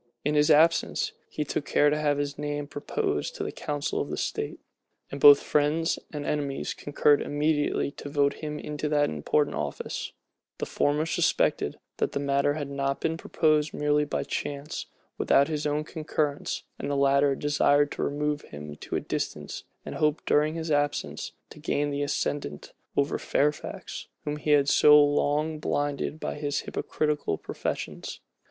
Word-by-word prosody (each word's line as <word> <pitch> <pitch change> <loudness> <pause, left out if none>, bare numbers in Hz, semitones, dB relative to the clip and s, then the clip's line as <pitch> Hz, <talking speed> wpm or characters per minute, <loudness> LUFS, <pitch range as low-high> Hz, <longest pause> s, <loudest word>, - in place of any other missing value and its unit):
In 150 - +2
his 150 +1 +4
absence, 160 +2 +4 0.2
he 150 - -2
took 145 - -2
care 145 +1 +3
to 150 - +1
have 145 -1 +2
his 145 0 -2
name 145 0 -3
proposed 400 - -2
to - - -3
the - - -3
council 145 -1 -2
of - - -3
state; - - -3 0.5
and 140 - -6
both 145 -1 +9
friends 150 +3 +1
and 145 -1 -5
enemies 140 -2 -2
concurred 145 0 +2
immediately 145 -1 0
to 145 - -8
vote 140 -1 +2
him 150 -1 -4
into 150 0 -4
that 145 -1 +2
important 80 - +1
office: 75 -1 -4 0.5
the - - -2
former 150 +2 +1
suspected, 165 - +1 0.2
that - - -1
the - - -1
matter 140 +1 +1
had 145 -2 -3
not 140 0 -1
been 160 - 0
proposed 155 -2 +1
merely 150 0 +2
by 150 - -2
chance, 145 +1 -4 0.3
without 140 - +4
his 150 -1 -1
own 150 +1 0
concurrence; 155 -2 -2 0.2
the 140 +1 -2
latter 140 0 +4
desired 145 0 +3
to - - -4
remove 150 +1 -1
him 75 0 -9
to - - -5
a - - +2
distance, - - -4 0.2
and - - -5
hoped, 150 0 0
during 150 +2 +2
his 160 -1 -3
absence, 145 0 -1 0.2
to - - -12
gain 145 0 0
the 140 0 -2
ascendant 140 - -2 0.2
over 140 +1 +1
Fairfax, 150 +1 -2 0.2
whom 150 0 -2
he 150 - -4
had 145 -2 +5
so 150 +1 +7
long 150 +2 +2
blinded 145 +1 -1
by - - -3
his 145 -1 -1
hypocritical 150 - -1
professions. - - -5
145 Hz, 160 wpm, -27 LUFS, 145-150 Hz, 0.5 s, both